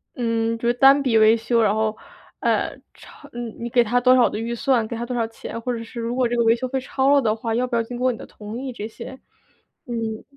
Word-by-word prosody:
嗯， 230 -1 -1
就 235 - -3
是 240 - +3
单 270 +3 +6
笔 250 -5 +2
维 220 +1 +6
修。 230 +1 +1
然 210 -2 +3
后， 220 0 0 0.5
呃， - - 0 0.2
超 - - -16 0.3
你 235 - -5
给 240 +1 +4
他 245 +3 +1
多 255 +1 +6
少 245 - +4
的 - - -5
预 230 +2 -3
算、 235 -1 +1
给 230 +1 -5
他 235 - -4
多 250 +1 -4
少 230 -1 0
钱， 225 0 -8
或 250 - -2
者 230 - -4
是， 230 +1 -8
如 230 +1 -3
果 250 -1 +1
这 240 - -2
个 235 - +2
维 225 0 +5
修 255 - -3
费 265 +1 -2
超 270 +2 +1
了 285 - +5
的 220 -4 +1
话， 225 0 -3
要 245 +2 +1
不 240 -2 -1
要 230 - +1
经 240 +2 -7
过 255 +1 +1
你 235 - -7
的 - - -9
同 210 +2 -9
意， 265 -2 -5
这 210 - -6
些， 225 - -9 0.7
嗯。 225 -3 -4
235 Hz, 290 characters per minute, -22 LUFS, 225-250 Hz, 0.7 s, 单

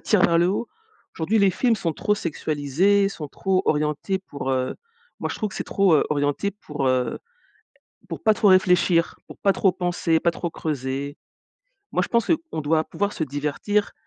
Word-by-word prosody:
tire 210 -4 +2
vers 170 -2 +4
le 175 +1 +3
haut. 205 +5 -1 0.5
Aujourd'hui, 190 +7 0
les 200 -2 +5
films 235 +4 +1
sont 170 -5 -2
trop 210 +7 0
sexualisés, 170 +4 +1
sont 155 -6 -7
trop 190 +5 0
orientés 150 +5 0
pour, 140 -8 -6
heu 130 -1 -1 0.5
moi, - - -2
je - - -4
trouve 215 - -2
que - - -11
c'est - - -3
trop, 195 -3 +2
heu, 150 - +4
orienté 145 +6 0
pour, 150 -8 -4
heu, 130 -1 0 0.9
pour - - -6
pas 220 - +5
trop 210 - +2
réfléchir, 180 -2 +4
pour - - -12
pas 200 - +3
trop 195 0 +2
penser, 170 -2 0
pas 170 - +2
trop 170 +1 -4
creuser. 140 -2 -4 0.8
Moi, - - +1
je - - -3
pense, 235 -2 +1
heu, 330 - +4
on - - -3
doit 155 +1 +1
pouvoir 205 +4 -2
se 160 - -1
divertir 150 +9 -1
170 Hz, 190 wpm, -23 LUFS, 145-200 Hz, 0.9 s, les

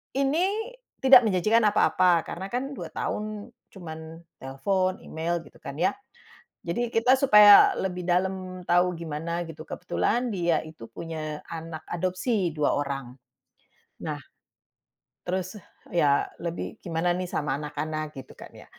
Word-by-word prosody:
"Ini 365 - 0 0.3
tidak 260 -2 +8
menjanjikan 215 +3 +3
apa-apa." 180 -4 +3
Karena 190 +3 -6
kan 265 +3 -2
2 - - -5
tahun 210 +1 -4 0.2
cuman 160 -2 -9 0.2
telfon, 185 +8 -1
email, 170 +2 -3
gitu - - -17
kan, 140 - -7
ya. 180 +6 +2 0.7
Jadi, 205 +9 -1
kita 250 +3 +4
supaya 210 -6 +8
lebih 180 -2 -3
dalam 185 0 -1
tau 175 +1 +2
gimana, 165 +1 -4
gitu. 160 -1 -10
Kebetulan, 245 0 -1
dia 175 -5 +1
itu 155 -8 -11
punya 155 +4 -6
anak 165 -1 -7
adopsi, 185 +1 -1
2 150 -1 +2
orang. 135 -3 -5 0.9
Nah, - - -4 1.1
terus 185 +3 -3 0.3
ya, 145 -5 +3 0.2
lebih 170 +5 -5
gimana 170 0 0
nih 180 +1 -3
sama 145 -4 -2
anak-anak, 155 0 -4
gitu 135 - -9
kan, - - -12
ya. - - -13
175 Hz, 130 wpm, -26 LUFS, 160-205 Hz, 1.1 s, tidak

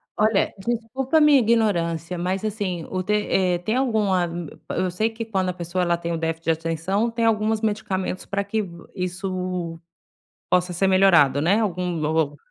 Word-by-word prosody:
Olha, 215 -1 +2
desculpa 240 +7 0
minha 300 -2 +7
ignorância, 180 -8 +1
mas 185 +3 -2
assim 195 -6 -3
o 185 -1 -2
te 210 - 0
eh, 190 -4 +1
tem 215 +6 -1
alguma 210 -8 +1 0.4
eu 185 +1 0
sei 215 +6 0
que 225 +1 -5
quando 190 -4 -1
a - - -2
pessoa, 175 +1 -2
ela 175 -1 +2
tem 170 0 -4
o 165 - -1
déficit 165 0 -3
de 165 - +3
atenção, 165 +7 -1
tem 230 0 0
algumas 220 0 +1
medicamentos 200 -4 -2
para 200 +1 -2
que 215 +2 -1 0.3
isso 180 -2 -3 0.7
possa 180 0 +2
ser 190 +3 +1
melhorado, 185 -8 +5
né, 190 +8 +3
algum 180 -5 -1
o 155 -1 +1
o - - -16
185 Hz, 175 wpm, -23 LUFS, 175-215 Hz, 0.7 s, minha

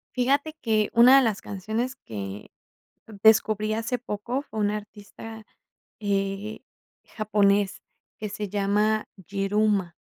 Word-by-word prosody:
Fíjate 280 +5 +1
que, 215 -2 +1
una 245 +3 +8
de 270 - +5
las 215 -4 0
canciones 220 +7 -3
que 100 - -8 0.7
descubrí 215 -1 +4
hace 230 +3 -2
poco 235 +3 -3
fue 220 -6 -9
un 205 0 +2
artista, 210 +1 -8 0.6
eh, 200 +1 -2 0.4
japonés, 205 -2 +1 0.4
que 210 -1 -5
se 210 0 -4
llama 210 +2 +1
Yiruma. 195 0 0
210 Hz, 115 wpm, -26 LUFS, 200-225 Hz, 0.7 s, una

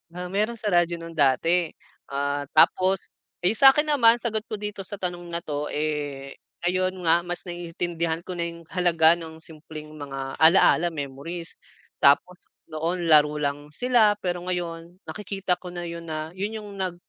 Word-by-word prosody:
Ah, 180 0 -6
meron 215 +4 0
sa 215 -2 -3
radyo 175 -1 +3
nung 165 0 -9
dati, 165 +4 +2 0.4
ah, 140 0 -2
tapos, 185 +4 +3 0.3
iyung 195 +5 +2
sa'kin 275 +2 +7
naman, 235 -5 +6
sagot 230 -2 -2
ko 215 - -4
dito 210 0 -6
sa 195 +1 -6
tanong 175 -2 -5
na 170 0 -5
'to 150 0 -3
eh, 145 -2 -4 0.2
ayon 185 +1 0
nga 165 0 +5
mas 175 0 -5
naiintindihan 170 -1 -3
ko - - -8
na 170 -1 -2
yung 170 0 -10
halaga 170 -2 +4
ng 160 -1 -9
simpleng 155 -1 -11
mga 135 -3 -7
ala-ala 165 +1 +5
memories, 160 +2 -6 0.4
tapos 175 +6 +4 0.3
noon 170 +3 -2
laro 150 -1 +6
lang 145 0 -2
sila 230 0 +3
pero 175 -2 -3
ngayon 170 -1 -4
nakikita 195 -3 -2
ko 180 -1 -9
na 175 - -4
yun 170 0 -7
na, 155 0 -4
yun 200 +5 -4
yung 205 - -10
nag, 185 -2 -2
170 Hz, 165 wpm, -25 LUFS, 155-185 Hz, 0.4 s, sa'kin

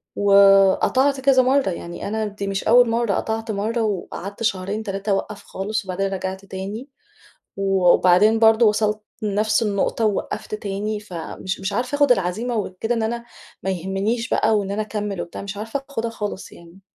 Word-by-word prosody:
وقطعت 200 +7 +4
كذا 265 -1 +5
مرّة، 265 -4 +2
يعني 170 +1 -6
أنا 220 +1 -2
دي 200 -1 -6
مش 195 0 -2
أول 240 +1 +5
مرّة، 230 -3 +1
قطعت 225 +2 -2
مرة 220 +3 -1
وقعدت 200 0 -4
شهرين، 200 +1 -1
3 195 0 -4
اوقّف 200 +1 -2
خالص 210 +2 -4
وبعدين 195 +1 -2
رَجعت 190 +1 -5
تاني 200 +8 -6 0.7
وبعدين 195 +2 +4
برضو 225 0 +5
وصلت 210 0 0 0.2
لنفس 215 +2 +1
النقطة 210 +2 0
ووقّفت 210 +1 -3
تاني، 210 +1 -3
فمش 185 0 -6
مش 190 - -3
عارفة 245 +6 -1
آخُد 285 -3 +5
العزيمة 215 +5 -1
وكده 215 +3 -2
إن 225 - -1
أنا 235 +1 -2 0.4
ما 190 - -1
يهمنيش 195 +6 -2
بقى 215 -1 +2
وإن 200 -1 -3
أنا 210 +2 -1
أكمل 210 -3 -4
وبتاع، 170 - -8
مش 200 0 -6
عارفة 225 +6 -4
آخُدها 230 -3 -2
خالص 210 -3 -6
يعني. 170 +3 -15
210 Hz, 165 wpm, -22 LUFS, 195-225 Hz, 0.7 s, كذا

